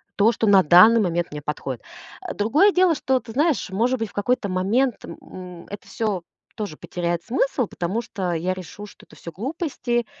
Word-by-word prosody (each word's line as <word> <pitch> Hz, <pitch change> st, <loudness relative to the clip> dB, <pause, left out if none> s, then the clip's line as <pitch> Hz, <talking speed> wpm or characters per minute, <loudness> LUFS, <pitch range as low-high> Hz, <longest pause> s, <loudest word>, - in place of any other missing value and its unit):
то, 215 Hz, +3 st, +4 dB
что 225 Hz, -1 st, -1 dB
на 195 Hz, -2 st, +6 dB
данный 200 Hz, +9 st, +7 dB
момент 175 Hz, -2 st, 0 dB
мне 150 Hz, 0 st, -6 dB
подходит. 135 Hz, -4 st, -4 dB, 0.4 s
А -, -, -5 dB
другое 295 Hz, -, +3 dB
дело, 360 Hz, -3 st, +3 dB
что 260 Hz, -1 st, +1 dB
ты 225 Hz, -3 st, -11 dB
знаешь, 290 Hz, -, +1 dB
может 235 Hz, +5 st, +1 dB
быть, 225 Hz, -2 st, -3 dB
в -, -, -20 dB
какой-то 205 Hz, 0 st, 0 dB
момент, 215 Hz, +7 st, 0 dB
м, -, -, -9 dB
м, 180 Hz, -2 st, -11 dB
это 205 Hz, 0 st, -9 dB
всё 205 Hz, -6 st, -2 dB, 0.3 s
тоже 205 Hz, -8 st, -4 dB
потеряет 175 Hz, -1 st, -3 dB
смысл, 255 Hz, 0 st, 0 dB
потому 190 Hz, +7 st, -3 dB
что 190 Hz, -6 st, -3 dB
я 180 Hz, +3 st, -1 dB
решу, 185 Hz, +3 st, -9 dB
что -, -, -16 dB
это -, -, -18 dB
всё 170 Hz, -, -9 dB
глупости, 245 Hz, -, -2 dB
205 Hz, 195 wpm, -23 LUFS, 180-245 Hz, 0.4 s, данный